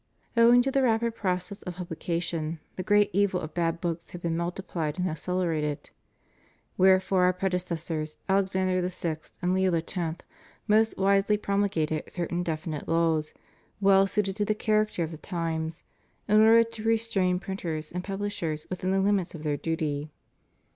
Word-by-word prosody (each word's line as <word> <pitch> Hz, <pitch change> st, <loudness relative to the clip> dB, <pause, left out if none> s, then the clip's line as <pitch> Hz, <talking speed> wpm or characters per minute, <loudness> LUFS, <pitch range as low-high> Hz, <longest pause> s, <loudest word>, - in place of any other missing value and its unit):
Owing 240 Hz, +1 st, +6 dB
to 270 Hz, -, 0 dB
the 275 Hz, -, +2 dB
rapid 235 Hz, -2 st, +2 dB
process 185 Hz, -1 st, -2 dB
of 180 Hz, -2 st, -6 dB
publica 170 Hz, -1 st, -3 dB
tion, 165 Hz, -2 st, -3 dB, 0.2 s
the -, -, -3 dB
great 205 Hz, +2 st, +3 dB
evil 200 Hz, -2 st, +2 dB
of 155 Hz, -2 st, -7 dB
bad 165 Hz, -1 st, 0 dB
books 170 Hz, -1 st, -3 dB
had 175 Hz, -, -9 dB
been 165 Hz, -1 st, 0 dB
multiplied 170 Hz, -2 st, -3 dB
and 180 Hz, 0 st, 0 dB
accelerated. 160 Hz, -3 st, -2 dB, 0.8 s
Wherefore 185 Hz, 0 st, +4 dB
Our 180 Hz, -, +4 dB
predecessors, 170 Hz, -4 st, -3 dB
Alexander 190 Hz, -1 st, +1 dB
VI. 170 Hz, -3 st, -3 dB, 0.3 s
and 180 Hz, +1 st, +2 dB
Leo 190 Hz, 0 st, +2 dB
X., 165 Hz, +3 st, -2 dB, 0.7 s
most 220 Hz, +1 st, +3 dB
wisely 195 Hz, +2 st, +3 dB
promulgated 200 Hz, -7 st, -1 dB
certain 175 Hz, 0 st, -2 dB
definite 155 Hz, -3 st, -4 dB
laws, 165 Hz, -2 st, +1 dB, 0.4 s
well 195 Hz, -1 st, +5 dB
suited 195 Hz, -1 st, -1 dB
to 205 Hz, -, +1 dB
the 215 Hz, +1 st, +1 dB
character 215 Hz, -4 st, +1 dB
of 160 Hz, -, -4 dB
the 160 Hz, -, -7 dB
times, 165 Hz, -2 st, -3 dB, 0.4 s
in 210 Hz, 0 st, +5 dB
order 225 Hz, +1 st, +7 dB
to 225 Hz, -1 st, -9 dB
restrain 220 Hz, -5 st, +1 dB
printers 165 Hz, -5 st, -4 dB
and 180 Hz, +1 st, -4 dB
pubUshers 195 Hz, -6 st, -3 dB
within 185 Hz, 0 st, -2 dB
the 195 Hz, 0 st, +2 dB
limits 195 Hz, -3 st, +1 dB
of 155 Hz, -, -8 dB
their 150 Hz, -2 st, 0 dB
duty. 155 Hz, -2 st, -2 dB
180 Hz, 155 wpm, -27 LUFS, 165-200 Hz, 0.8 s, order